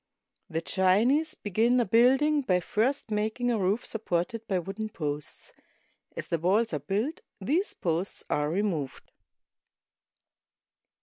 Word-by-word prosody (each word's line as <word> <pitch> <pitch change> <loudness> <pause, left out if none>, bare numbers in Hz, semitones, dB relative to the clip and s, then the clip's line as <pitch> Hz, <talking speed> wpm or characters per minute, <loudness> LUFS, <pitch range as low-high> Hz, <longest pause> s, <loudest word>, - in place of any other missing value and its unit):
The 165 -1 -2
Chinese 220 - +2
begin 225 +5 +2
a 240 - +2
building 265 +8 +4
by 185 -9 +2
first 240 +6 -1
making 220 +4 0
a 225 - 0
roof 195 +5 0
supported 220 +1 -2
by 190 - +1
wooden 195 +5 -4
posts. 150 -6 -5 0.6
As - - -4
the 170 - -1
walls 200 +5 +2
are 150 - 0
built, 205 - -2 0.2
these 310 - 0
posts 170 +2 -2
are 150 0 0
removed. 170 -6 -2
210 Hz, 125 wpm, -28 LUFS, 180-240 Hz, 0.6 s, building